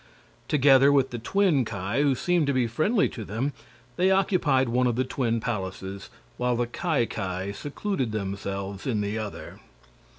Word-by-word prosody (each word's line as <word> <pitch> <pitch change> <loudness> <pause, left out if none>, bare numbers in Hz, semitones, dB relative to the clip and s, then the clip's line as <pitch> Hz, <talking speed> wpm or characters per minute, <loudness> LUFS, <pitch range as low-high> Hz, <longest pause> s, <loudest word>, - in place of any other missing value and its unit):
Together 140 -1 +5
with 135 -2 +3
the 120 - -4
twin 170 - +2
Ki, 100 +3 -2
who 140 -2 +3
seemed 175 +2 +1
to 140 - +2
be 130 -2 +2
friendly 155 - +2
to 115 - -7
them, 115 +8 -2 0.4
they 185 +1 +3
occupied 180 -9 +2
one 125 +2 +2
of 120 - 0
the 130 - +1
twin 120 -3 -1
palaces, 95 -3 -5 0.3
while 125 0 +1
the 120 +1 0
Ki 135 +1 0
Ki 95 -1 -4
secluded 145 - -3
themselves 100 -1 -4
in 110 -5 0
the 105 +2 -2
other. 105 -2 -7
125 Hz, 165 wpm, -26 LUFS, 105-145 Hz, 0.4 s, Together